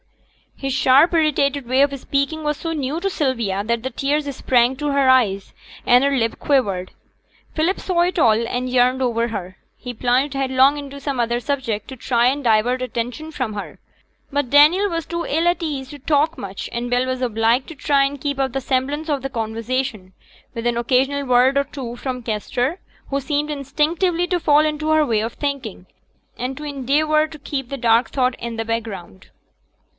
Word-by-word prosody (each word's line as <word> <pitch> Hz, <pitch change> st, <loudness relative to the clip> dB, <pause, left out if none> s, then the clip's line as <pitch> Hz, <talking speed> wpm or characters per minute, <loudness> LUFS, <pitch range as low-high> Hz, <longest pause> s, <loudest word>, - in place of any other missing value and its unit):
His 270 Hz, -1 st, -3 dB
sharp 270 Hz, +5 st, +5 dB
irritated 285 Hz, -4 st, +1 dB
way 260 Hz, +2 st, +3 dB
of 280 Hz, 0 st, +2 dB
speaking 280 Hz, +4 st, -1 dB
was 300 Hz, -1 st, -1 dB
so 330 Hz, -, -4 dB
new 295 Hz, +1 st, -2 dB
to 390 Hz, +3 st, -1 dB
Sylvia, 235 Hz, -, -1 dB
that 235 Hz, +1 st, -1 dB
the 260 Hz, -, -2 dB
tears 285 Hz, +2 st, -1 dB
sprang 245 Hz, 0 st, +2 dB
to 295 Hz, +1 st, -2 dB
her 275 Hz, -1 st, +3 dB
eyes, 205 Hz, -7 st, +2 dB, 0.3 s
and 245 Hz, +2 st, +5 dB
her 280 Hz, 0 st, +2 dB
lip 230 Hz, -3 st, 0 dB
quivered. 200 Hz, -11 st, 0 dB, 0.6 s
Philip 330 Hz, +5 st, +1 dB
saw 355 Hz, -2 st, 0 dB
it 355 Hz, +1 st, +1 dB
all, 230 Hz, -3 st, +3 dB
and 250 Hz, +1 st, -2 dB
yearned 255 Hz, +1 st, +2 dB
over 235 Hz, -2 st, +1 dB
her. 190 Hz, -4 st, -6 dB, 0.2 s
He 250 Hz, -, -7 dB
plunged 250 Hz, +4 st, +1 dB
headlong 270 Hz, +1 st, +3 dB
into 280 Hz, -1 st, -8 dB
some 275 Hz, -2 st, -3 dB
other 235 Hz, 0 st, 0 dB
subject 245 Hz, -6 st, -3 dB
to 265 Hz, -, -8 dB
try 240 Hz, -1 st, +1 dB
and 280 Hz, +3 st, 0 dB
divert 240 Hz, +2 st, +2 dB
attention 250 Hz, +5 st, -4 dB
from 255 Hz, -7 st, -3 dB
her; 205 Hz, -, -7 dB, 0.5 s
but 285 Hz, -3 st, -1 dB
Daniel 320 Hz, +8 st, +6 dB
was 330 Hz, -3 st, -3 dB
too 340 Hz, 0 st, -4 dB
ill 325 Hz, +4 st, +1 dB
at 345 Hz, 0 st, +1 dB
ease 275 Hz, -5 st, -4 dB
to 290 Hz, -, -10 dB
talk 305 Hz, +3 st, +1 dB
much, 195 Hz, -1 st, -6 dB
and 240 Hz, +1 st, -3 dB
Bell 245 Hz, +1 st, +1 dB
was 255 Hz, 0 st, -3 dB
obliged 230 Hz, +2 st, +1 dB
to 325 Hz, -, -9 dB
try 280 Hz, 0 st, +2 dB
and 275 Hz, 0 st, -3 dB
keep 285 Hz, -1 st, -2 dB
up 270 Hz, -1 st, 0 dB
the 270 Hz, -, -2 dB
semblance 275 Hz, +5 st, -1 dB
of 280 Hz, -3 st, -1 dB
conversation, 225 Hz, -3 st, -3 dB, 0.4 s
with 230 Hz, 0 st, -5 dB
an 240 Hz, -1 st, 0 dB
occasional 265 Hz, +4 st, +1 dB
word 255 Hz, +2 st, +4 dB
or 280 Hz, -, +3 dB
two 260 Hz, -4 st, -7 dB
from 250 Hz, 0 st, -5 dB
Kester, 245 Hz, -, -2 dB, 0.3 s
who 275 Hz, -, 0 dB
seemed 295 Hz, +2 st, -2 dB
instinctively 315 Hz, +5 st, 0 dB
to 355 Hz, 0 st, 0 dB
fall 300 Hz, -1 st, +4 dB
into 305 Hz, 0 st, -2 dB
her 310 Hz, -1 st, +4 dB
way 225 Hz, -5 st, +1 dB
of 225 Hz, +1 st, -3 dB
thinking, 275 Hz, -10 st, -4 dB, 0.5 s
and 255 Hz, +2 st, -3 dB
to 300 Hz, -, -7 dB
endeavour 300 Hz, +2 st, +1 dB
to 310 Hz, -1 st, -12 dB
keep 270 Hz, -2 st, -4 dB
the 275 Hz, -, -4 dB
dark 235 Hz, -1 st, +3 dB
thought 255 Hz, -2 st, 0 dB
in 235 Hz, -1 st, -5 dB
the 225 Hz, -, -2 dB
background. 220 Hz, -, -5 dB
265 Hz, 190 wpm, -21 LUFS, 240-290 Hz, 0.6 s, Daniel